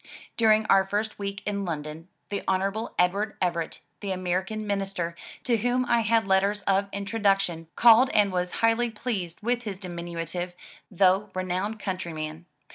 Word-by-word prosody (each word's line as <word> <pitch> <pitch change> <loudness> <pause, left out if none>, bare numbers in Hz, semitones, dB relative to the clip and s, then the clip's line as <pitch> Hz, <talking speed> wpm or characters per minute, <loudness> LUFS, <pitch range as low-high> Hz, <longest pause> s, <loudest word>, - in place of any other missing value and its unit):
During 220 -1 +4
our 195 -2 +5
first 210 +2 -2
week 200 0 -4
in 200 -1 -1
London, 155 -1 -5 0.2
the 200 - -2
Hon. 195 +4 0
Edward 200 +4 +1
Everett, 170 -3 -2 0.2
the 200 - -5
American 185 +4 -2
minister, 195 -4 -2 0.3
to 240 -3 +2
whom 245 +3 +1
I 240 -1 +3
had 225 -1 +2
letters 195 +2 +2
of 200 0 +1
introduction, 195 -5 0
called 240 +2 +7
and 205 -2 +3
was 180 -1 -1 0.2
highly 230 +1 +3
pleased 210 -6 -4
with 240 +1 +1
his 205 -5 -5
diminutive, 175 -1 -5 0.4
though 190 +2 +3
re 185 - -1
nowned 185 +4 -2
countryman. 170 -4 -5
195 Hz, 150 wpm, -26 LUFS, 180-215 Hz, 0.4 s, called